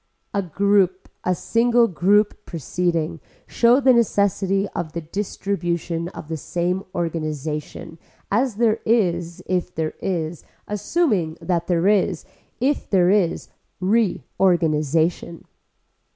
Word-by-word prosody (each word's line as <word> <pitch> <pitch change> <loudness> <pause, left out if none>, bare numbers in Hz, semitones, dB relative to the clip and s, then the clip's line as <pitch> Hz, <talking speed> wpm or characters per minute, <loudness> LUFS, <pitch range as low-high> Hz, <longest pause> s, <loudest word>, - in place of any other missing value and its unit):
A 200 - +1
group 190 +1 +1
a 180 - +1
single 235 +4 +3
group 205 +3 +2
proceeding 165 +1 -2 0.3
show 240 +2 +4
the 260 -2 +5
necessity 200 -3 +2
of 165 -3 -5
the 170 - -3
distribution 175 -2 -3
of 155 - -10
the 160 0 -3
same 180 +5 -2
organization 155 -1 -4 0.3
as 235 +2 +1
there 225 0 +2
is 175 -7 0
if 180 -1 -2
there 160 -1 -2
is, 170 -3 -3 0.2
assuming 205 - 0
that 170 -2 -1
there 175 +1 +2
is, 200 -4 +2 0.3
if 275 +4 0
there 185 -2 +4
is 195 -5 +1 0.3
reorganization. 170 -6 +1
180 Hz, 110 wpm, -22 LUFS, 165-205 Hz, 0.3 s, the